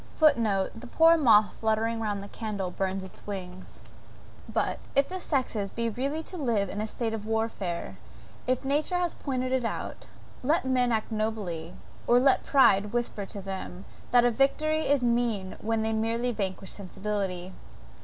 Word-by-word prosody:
(*Footnote. 225 Hz, -11 st, +3 dB
The 250 Hz, -, -10 dB
poor 325 Hz, +6 st, +6 dB
moth 220 Hz, -9 st, +5 dB
fluttering 225 Hz, +1 st, +1 dB
round 205 Hz, -3 st, -2 dB
a -, -, -8 dB
candle, 205 Hz, -4 st, -4 dB
burns 190 Hz, +1 st, -2 dB
its 190 Hz, -, -13 dB
wings.) 185 Hz, -2 st, -7 dB, 0.7 s
But, -, -, 0 dB, 0.2 s
if 275 Hz, 0 st, +4 dB
the 370 Hz, +1 st, -4 dB
sexes 240 Hz, -10 st, -1 dB
be 230 Hz, +2 st, -1 dB
really 275 Hz, +7 st, -2 dB
to 365 Hz, -, -7 dB
live 225 Hz, -, +1 dB
in 205 Hz, -, -3 dB
a 215 Hz, -, -2 dB
state 225 Hz, 0 st, -3 dB
of 215 Hz, -1 st, -5 dB
warfare, 220 Hz, -6 st, -2 dB, 0.5 s
if 255 Hz, +1 st, 0 dB
nature 295 Hz, +6 st, +1 dB
has 350 Hz, -2 st, 0 dB
pointed 255 Hz, -2 st, -2 dB
it 260 Hz, -1 st, +1 dB
out, 230 Hz, -, -4 dB, 0.3 s
let 295 Hz, +3 st, +1 dB
men 250 Hz, -2 st, +2 dB
act 220 Hz, 0 st, -1 dB
nobly, 205 Hz, -7 st, -3 dB, 0.3 s
or 240 Hz, +1 st, +6 dB
let 265 Hz, +1 st, +4 dB
pride 210 Hz, -7 st, +4 dB
whisper 235 Hz, -4 st, -2 dB
to 200 Hz, -, -7 dB
them, 190 Hz, -1 st, -6 dB, 0.2 s
that 245 Hz, -, +6 dB
the 240 Hz, 0 st, +3 dB
victory 310 Hz, +5 st, +1 dB
is 280 Hz, -2 st, +3 dB
mean 235 Hz, -5 st, 0 dB
when 225 Hz, 0 st, 0 dB
they 220 Hz, 0 st, 0 dB
merely 230 Hz, +3 st, 0 dB
vanquish 195 Hz, -3 st, -3 dB
sensibility. 190 Hz, -2 st, -4 dB
225 Hz, 165 wpm, -28 LUFS, 200-255 Hz, 0.7 s, poor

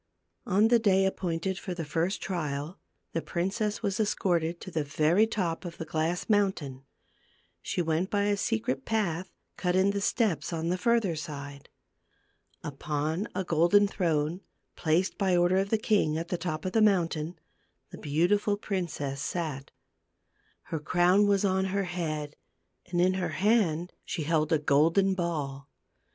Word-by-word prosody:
On 210 Hz, +4 st, +4 dB
the 240 Hz, -1 st, +5 dB
day 195 Hz, -3 st, +3 dB
appointed 185 Hz, 0 st, -2 dB
for 185 Hz, -3 st, -5 dB
the 165 Hz, -2 st, -4 dB
first 165 Hz, +6 st, -1 dB
trial, 155 Hz, -2 st, -3 dB, 0.3 s
the 165 Hz, -, -1 dB
princess 205 Hz, +7 st, -2 dB
was 200 Hz, -1 st, -1 dB
escorted 175 Hz, -5 st, 0 dB
to 185 Hz, -, -8 dB
the 160 Hz, -2 st, -1 dB
very 155 Hz, +8 st, +3 dB
top 180 Hz, -7 st, -2 dB
of 175 Hz, -2 st, -7 dB
the 165 Hz, -, -5 dB
glass 160 Hz, +3 st, -1 dB
mountain; 180 Hz, -, 0 dB, 0.8 s
she 175 Hz, -, -2 dB
went 165 Hz, +3 st, 0 dB
by 205 Hz, -1 st, +1 dB
a 205 Hz, 0 st, +2 dB
secret 130 Hz, -, -1 dB
path 185 Hz, -4 st, -1 dB, 0.3 s
cut 180 Hz, -1 st, 0 dB
in 190 Hz, +1 st, +4 dB
the 200 Hz, 0 st, -2 dB
steps, 190 Hz, -, 0 dB
on 165 Hz, 0 st, -2 dB
the 180 Hz, -, 0 dB
further 225 Hz, -5 st, +2 dB
side. 145 Hz, -2 st, -7 dB, 0.9 s
Upon 150 Hz, +6 st, -2 dB
a 190 Hz, -, 0 dB
golden 175 Hz, +5 st, +4 dB
throne, 165 Hz, -2 st, -1 dB, 0.3 s
placed, 170 Hz, +4 st, 0 dB
by 190 Hz, -3 st, +3 dB
order 175 Hz, +2 st, +3 dB
of 195 Hz, +1 st, +1 dB
the 220 Hz, -, +2 dB
king, 205 Hz, -8 st, +1 dB
at 165 Hz, +1 st, -4 dB
the -, -, 0 dB
top 160 Hz, -2 st, -3 dB
of 185 Hz, -, -1 dB
the 225 Hz, -, +2 dB
mountain, 175 Hz, -5 st, +1 dB, 0.5 s
the -, -, -9 dB
beautiful 190 Hz, +8 st, +1 dB
princess 160 Hz, -9 st, -3 dB
sat. 150 Hz, -4 st, -3 dB, 0.9 s
Her 160 Hz, -, -4 dB
crown 180 Hz, +6 st, +3 dB
was 200 Hz, 0 st, +3 dB
on 190 Hz, 0 st, +1 dB
her 195 Hz, +1 st, -1 dB
head, 155 Hz, -5 st, -4 dB, 0.5 s
and 175 Hz, -1 st, -1 dB
in 185 Hz, +1 st, +4 dB
her 185 Hz, -1 st, -1 dB
hand 180 Hz, -5 st, +2 dB
she 160 Hz, -, -4 dB
held 155 Hz, 0 st, +1 dB
a 160 Hz, -, +5 dB
golden 160 Hz, +7 st, +3 dB
ball. 145 Hz, -6 st, -3 dB
175 Hz, 160 wpm, -28 LUFS, 155-195 Hz, 0.9 s, the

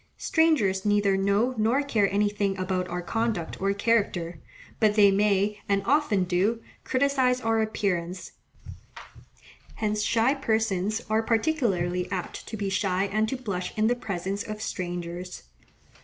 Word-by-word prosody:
Strangers 250 Hz, -, +2 dB
neither 205 Hz, -2 st, +2 dB
know 200 Hz, +6 st, +1 dB
nor 235 Hz, +6 st, +2 dB
care 215 Hz, -8 st, +1 dB
anything 205 Hz, -1 st, 0 dB
about 185 Hz, -1 st, -1 dB
our 175 Hz, 0 st, -4 dB
conduct 225 Hz, -6 st, -2 dB
or 195 Hz, 0 st, +2 dB
character, 200 Hz, -6 st, 0 dB, 0.4 s
but 215 Hz, -2 st, +3 dB
they 205 Hz, -2 st, +6 dB
may, 205 Hz, +1 st, +1 dB
and 200 Hz, -1 st, +2 dB
often 280 Hz, -9 st, +2 dB
do, 190 Hz, +6 st, +1 dB, 0.2 s
criticize 260 Hz, -1 st, +2 dB
our 225 Hz, -2 st, +1 dB
appearance: 185 Hz, -5 st, -2 dB, 1.4 s
hence 215 Hz, -1 st, -1 dB
shy 230 Hz, +5 st, +2 dB
persons 220 Hz, -5 st, 0 dB
are 220 Hz, +1 st, +2 dB
particularly 220 Hz, -, 0 dB
apt 185 Hz, -2 st, -5 dB
to 220 Hz, -, -6 dB
be 200 Hz, -1 st, -2 dB
shy 190 Hz, -1 st, 0 dB
and 215 Hz, 0 st, +1 dB
to 265 Hz, -, -2 dB
blush 200 Hz, -8 st, -4 dB
in 215 Hz, -, +2 dB
the 240 Hz, +2 st, +3 dB
presence 195 Hz, -3 st, -4 dB
of 215 Hz, -1 st, -6 dB
strangers. 175 Hz, -3 st, -5 dB
205 Hz, 140 wpm, -26 LUFS, 190-225 Hz, 1.4 s, they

